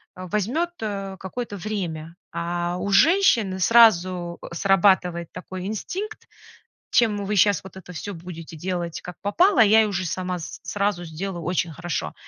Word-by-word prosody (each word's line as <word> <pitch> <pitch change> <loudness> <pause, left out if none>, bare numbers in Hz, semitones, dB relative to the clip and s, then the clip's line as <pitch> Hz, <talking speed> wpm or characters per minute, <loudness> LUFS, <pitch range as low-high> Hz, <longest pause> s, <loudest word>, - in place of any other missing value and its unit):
э, 185 - -8
возьмёт, 255 - 0
э, 195 -3 -4
какое-то 205 +2 -5
время, 170 -5 -4 0.2
а 175 +1 -2
у 200 - -3
женщины 230 - +4
сразу, 185 -5 +4
э, - - -8
срабатывает 180 -3 +2
такой 185 0 -7
инстинкт: 385 - -5 0.6
"Чем 210 -4 +2
вы 210 +1 -1
щас 200 -1 +4
вот 190 -1 -12
это 180 -1 -10
все 200 +4 -6
будете 165 -1 -9
делать 175 0 -3
как 180 -2 -8
попало, 285 - +3
а - - +9
я 220 +1 +5
уже 185 -2 -2
и - - -3
сама 180 +2 -3
с 160 - -8
сразу 200 -3 -1
сделаю 170 +2 -5
очень 175 -2 -1
хорошо". 170 - -4
190 Hz, 160 wpm, -24 LUFS, 175-210 Hz, 0.6 s, а